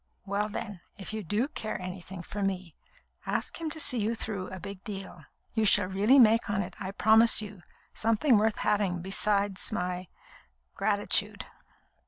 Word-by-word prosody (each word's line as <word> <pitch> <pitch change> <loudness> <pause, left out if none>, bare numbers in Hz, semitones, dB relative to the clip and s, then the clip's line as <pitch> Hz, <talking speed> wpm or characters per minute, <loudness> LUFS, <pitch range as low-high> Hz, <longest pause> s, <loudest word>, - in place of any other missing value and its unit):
"Well, 205 +1 -1
then, 205 -3 -6 0.2
if 200 +2 -7
you 220 -1 -4
do 210 - 0
care 225 -9 -5
anything 185 0 -7
for 205 - -6
me, 185 -4 -3 0.5
ask - - -2
him 320 - -2
to 315 - -5
see 255 -5 +4
you 220 +2 0
through 205 -4 -3
a 190 - -8
big 200 +1 -9
deal. 195 -6 -8 0.3
You 220 - +1
shall 205 -2 +5
really 200 +8 +3
make 225 -3 +5
on 200 -1 0
it, 175 - -9
I 190 -2 -4
promise 220 +3 +5
you, 210 -3 -2 0.3
something 225 +2 +3
worth 220 0 +1
having 190 -4 0
besides 200 +1 0
my 180 -3 -3 0.7
gratitude." - - +1
205 Hz, 165 wpm, -29 LUFS, 190-220 Hz, 0.7 s, shall